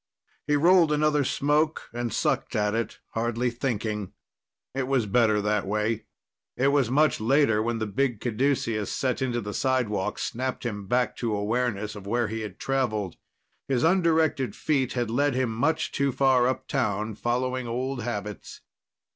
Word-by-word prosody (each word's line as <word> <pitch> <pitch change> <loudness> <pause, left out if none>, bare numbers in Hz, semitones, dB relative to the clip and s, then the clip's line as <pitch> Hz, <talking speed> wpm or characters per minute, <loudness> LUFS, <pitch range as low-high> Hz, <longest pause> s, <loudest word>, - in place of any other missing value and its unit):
He 150 - +3
rolled 170 +1 +5
another 150 -1 +2
smoke 150 +4 +1
and 120 -1 -3
sucked - - 0
at 105 -1 +1
it, 115 0 -2
hardly 120 +2 -1
thinking. 110 -5 -3 0.6
It 135 -1 -2
was 130 -4 +2
better 110 0 +3
that 105 -1 0
way. 105 +2 -1 0.5
It 135 +2 +3
was 140 -4 +2
much 150 +2 +3
later 115 -2 +3
when 115 +1 -1
the 110 - -2
big 115 +2 -1
caduceus 115 -3 0
set 130 -1 -1
into 120 -2 0
the 105 -1 -5
sidewalk 105 -7 0
snapped 130 +1 -3
him 105 -4 -4
back 125 +3 +1
to 115 -3 -1
awareness 105 0 -1
of 100 -1 -9
where 120 +1 0
he'd 110 -3 -5
traveled. 110 -9 -1 0.5
His 130 -3 +1
undirected 160 -6 +2
feet 135 -5 0
had 120 -3 -1
led 140 +2 +1
him 130 -3 0
much 155 +8 0
too 140 0 +1
far 130 -1 +3
uptown, 110 -5 -1
following 125 +3 -1
old 130 +2 -2
habits. 105 -3 -5
120 Hz, 155 wpm, -26 LUFS, 110-135 Hz, 0.6 s, rolled